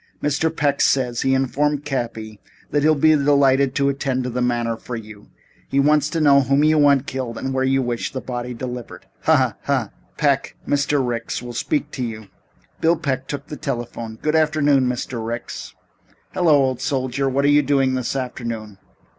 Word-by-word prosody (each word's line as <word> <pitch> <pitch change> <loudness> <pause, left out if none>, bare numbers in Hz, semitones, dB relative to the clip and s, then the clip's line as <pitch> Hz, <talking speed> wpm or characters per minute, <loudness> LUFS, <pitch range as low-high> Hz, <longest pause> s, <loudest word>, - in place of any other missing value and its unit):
"Mr. 150 +2 0
Peck 145 -3 0
says," 125 -3 +2
he 135 0 +2
informed 145 +2 0
Cappy, 115 -6 -4 0.3
"that 145 - +2
he'll 155 +1 +4
be 155 +2 +4
delighted 140 -2 +3
to 140 -1 +2
attend 135 -2 -1
to 125 - -3
the 125 +1 -2
matter 120 -2 0
for 120 +2 -7
you. 105 -2 -10 0.4
He 140 - +1
wants 150 +1 +3
to 165 - -2
know 140 -2 +5
whom 140 +2 +2
you 155 0 +4
want 140 -2 +4
killed 130 -5 -4
and 135 0 -3
where 130 0 0
you 135 0 +2
wish 120 -1 -3
the 130 - -4
body 125 -1 -5
delivered. 125 -1 -7 0.2
Hah - - +5
hah! - - +1
Hah! - - 0 0.3
Peck, - - +1
Mr. 145 -2 +1
Ricks 120 0 -3
will 120 0 -7
speak 145 +5 -1
to 130 - -4
you." 110 -3 -6 0.5
Bill 165 +1 +3
Peck 135 -3 -2
took 140 -1 -5
the 150 - -8
telephone. 120 -5 -5
"Good 155 +1 0
afternoon, 145 -4 +3
Mr. 125 -1 -3
Ricks." 115 +1 -6 0.6
"Hello, 175 -5 +4
old 130 -1 -1
soldier. 135 -1 -1
What 140 +2 +1
are - - +4
you 145 0 +5
doing 135 -3 +2
this 130 0 -2
afternoon?" 115 -5 -5
135 Hz, 190 wpm, -21 LUFS, 120-145 Hz, 0.6 s, know